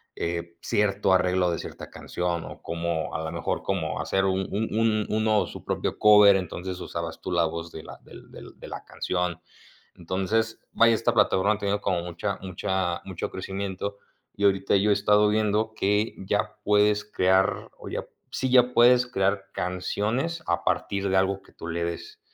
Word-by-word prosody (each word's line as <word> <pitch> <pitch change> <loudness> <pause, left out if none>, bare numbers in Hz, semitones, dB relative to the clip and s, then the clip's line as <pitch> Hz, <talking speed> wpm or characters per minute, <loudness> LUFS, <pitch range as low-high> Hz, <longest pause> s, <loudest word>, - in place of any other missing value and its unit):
eh, 85 0 -4
cierto 100 -2 +1
arreglo 90 -1 +2
de 85 - -2
cierta - - -9
canción 85 -2 -3
o - - -11
como 85 -1 -2
a - - -1
la 80 - -3
mejor - - -2
como 80 -7 -2
hacer 95 0 0
un 95 0 +1
un 110 +3 -1
un 110 -2 +2
uno 110 -1 +2
su - - -10
propio - - -2
cover 105 -2 +8
entonces 90 0 -4
usabas 85 -1 -5
tú - - -5
la 85 -1 +3
voz 85 +1 -5
de 80 - -9
la - - -11
del - - -14
del - - -12
de - - -9
la - - -7
canción, 90 -2 -2 0.6
entonces, 95 +6 -1
vaya, 115 0 +5
esta 115 +1 +1
plataforma 105 -2 +3
ha - - -4
tenido 100 0 0
como 90 -2 0
mucha 90 +3 -3
mucha 95 -1 -2
mucho 95 -3 -4
crecimiento 100 +1 -5 0.4
y 100 - 0
ahorita 95 0 +3
yo 100 +2 +2
he - - +7
estado 105 +1 +4
viendo 110 +1 +1
que 105 +1 +1
ya 105 +2 -1
puedes 105 0 +3
crear 95 -2 +1
o - - -11
ya - - -4 0.3
sí 130 - -1
ya 125 -1 +5
puedes 125 +1 +6
crear 100 -4 0
canciones 105 - -2
a 85 - 0
partir 100 0 -1
de 95 - +1
algo 95 +1 +1
que - - -21
tú 85 - -9
le 85 +1 -2
des, 85 0 -6
95 Hz, 185 wpm, -26 LUFS, 90-105 Hz, 0.6 s, cover